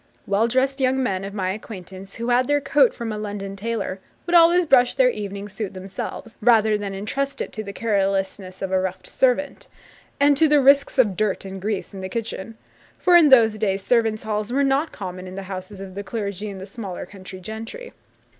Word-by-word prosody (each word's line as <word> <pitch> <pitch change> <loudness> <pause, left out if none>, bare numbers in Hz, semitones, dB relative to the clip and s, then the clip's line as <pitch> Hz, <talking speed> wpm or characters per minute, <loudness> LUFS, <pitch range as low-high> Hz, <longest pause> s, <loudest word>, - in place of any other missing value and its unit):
Well 200 +3 +2
dressed 265 +3 +1
young 265 0 +2
men 190 -5 -1
of 200 +1 -6
my 185 -2 -1
acquaintance, 195 -2 -9
who 235 +1 -3
had 245 +1 +3
their 290 0 +3
coat 275 -2 +4
from 230 -1 -5
a 210 - -4
London 200 -2 -5
tailor, 215 -2 -3 0.3
would 345 - -3
always 345 +1 +6
brush 250 -5 +4
their 250 -1 +4
evening 200 -2 -6
suit 205 -1 -6
themselves, 195 +4 -7
rather 220 -2 +4
than 200 -2 -4
entrust 275 +8 -3
it - - -4
to 215 - -4
the 200 - -6
carelessness 195 -3 -1
of 190 - -3
a 190 - +3
rough 190 0 -4
servant, 265 +2 0 0.5
and 285 0 +5
to 320 +1 +5
the 295 -1 +5
risks 275 +1 +4
of 215 -7 +3
dirt 210 -1 -1
and 190 0 -7
grease 205 0 -3
in 195 - -7
the 190 - -5
kitchen; 225 0 -5 0.4
for 360 - +4
in 330 -4 +7
those 225 -5 +6
days 195 -2 -1
servants' 225 -3 +2
halls 215 +1 -2
were 275 +2 +2
not 275 +4 +1
common 185 0 -7
in 185 - -8
the 195 - -5
houses 190 +1 -7
of 195 -1 -8
the 200 +2 -5
clergy 205 -1 -4
and 195 -1 -7
the 190 - -7
smaller 195 -2 -7
country 185 0 -11
gentry. 225 - -8
215 Hz, 210 wpm, -23 LUFS, 195-250 Hz, 0.5 s, in